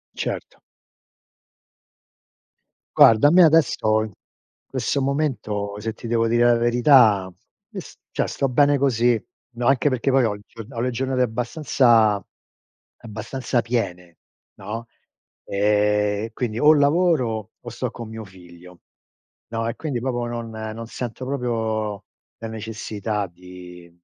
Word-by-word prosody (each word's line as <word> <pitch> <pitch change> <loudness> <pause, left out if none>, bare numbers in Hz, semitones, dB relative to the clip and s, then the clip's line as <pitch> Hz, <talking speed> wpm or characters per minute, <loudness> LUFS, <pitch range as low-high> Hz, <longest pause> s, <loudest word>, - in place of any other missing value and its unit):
Certo. - - -5 2.4
Guarda, 115 +6 +7
a - - +1
me 180 - +6
adesso, 145 -9 +4
in 110 - -7 0.5
questo 140 - -2
momento, 110 -8 -2
se 115 - -3
ti 120 - -9
devo 115 -1 +1
dire 120 +1 +3
la 120 0 +5
verità, 120 -5 +4 0.4
io - - -6
s - - -14
cioè, - - -1
sto 135 - -1
bene 145 +3 +3
così. 120 -4 +2 0.3
No, 120 +1 -1
anche 140 +2 +3
perché 130 +1 0
poi 130 -1 +4
ho 105 -2 -1
giorna 115 +2 -11
ho - - -1
le 125 +1 0
giornate 130 +1 -1
abbastanza 120 - +2 0.8
abbastanza 120 +3 -3
piene, 90 -8 -4 0.4
no, 110 +4 -7 0.6
e 105 +1 +1
quindi 115 -3 -3
o 155 +1 +6
lavoro 140 - +1
o 120 - -9
sto 120 +2 -4
con 115 -2 -8
mio 110 0 -7
figlio. 90 -1 -16 0.7
No, 115 0 -3
e 115 - -3
quindi 140 -7 -3
proprio 120 -2 -2
non 115 -1 -5
non 110 +1 -6
sento 125 +1 -6
proprio 110 -5 -2 0.3
la 115 - -6
necessità 110 -2 -4
di 90 0 -13
115 Hz, 130 wpm, -22 LUFS, 105-125 Hz, 2.4 s, Guarda